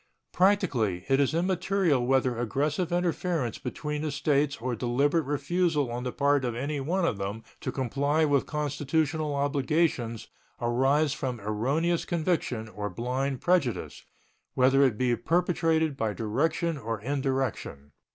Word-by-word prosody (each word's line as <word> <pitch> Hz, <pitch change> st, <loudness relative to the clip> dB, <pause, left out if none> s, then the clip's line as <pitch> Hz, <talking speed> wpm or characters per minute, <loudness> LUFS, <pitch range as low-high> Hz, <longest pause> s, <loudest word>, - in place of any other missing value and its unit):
Practically 140 Hz, -, +2 dB
it 135 Hz, 0 st, +4 dB
is 140 Hz, +2 st, +2 dB
immaterial 180 Hz, -4 st, +1 dB
whether 130 Hz, -2 st, +2 dB
aggressive 145 Hz, -, -1 dB
interference 175 Hz, -6 st, -1 dB
between 150 Hz, -1 st, -4 dB
the 155 Hz, -, -1 dB
States 140 Hz, 0 st, +1 dB
or 125 Hz, +1 st, -2 dB
deliberate 140 Hz, +7 st, +1 dB
refusal 145 Hz, -1 st, 0 dB
on 120 Hz, +1 st, -4 dB
the 125 Hz, -, -2 dB
part 140 Hz, 0 st, +2 dB
of 120 Hz, -2 st, -2 dB
any 140 Hz, +4 st, -2 dB
one 170 Hz, +7 st, 0 dB
of 105 Hz, -11 st, -1 dB
them 100 Hz, +3 st, -4 dB, 0.2 s
to -, -, -3 dB
comply 140 Hz, +4 st, +1 dB
with 145 Hz, -3 st, +1 dB
constitutional 150 Hz, +1 st, -1 dB
obligations 140 Hz, -4 st, 0 dB, 0.3 s
arise 135 Hz, +5 st, +2 dB
from 125 Hz, -5 st, -3 dB
erroneous 135 Hz, +12 st, 0 dB
conviction 160 Hz, -9 st, -1 dB
or 105 Hz, -1 st, -5 dB
blind 130 Hz, +6 st, -2 dB
prejudice, 140 Hz, -, 0 dB, 0.5 s
whether 130 Hz, +2 st, +4 dB
it 130 Hz, -6 st, +3 dB
be 125 Hz, 0 st, +2 dB
perpetrated 165 Hz, -1 st, +1 dB
by 110 Hz, -5 st, -1 dB
direction 145 Hz, +9 st, -1 dB
or 115 Hz, -2 st, -3 dB
indirection. 130 Hz, -, -2 dB
140 Hz, 135 wpm, -28 LUFS, 120-160 Hz, 0.5 s, it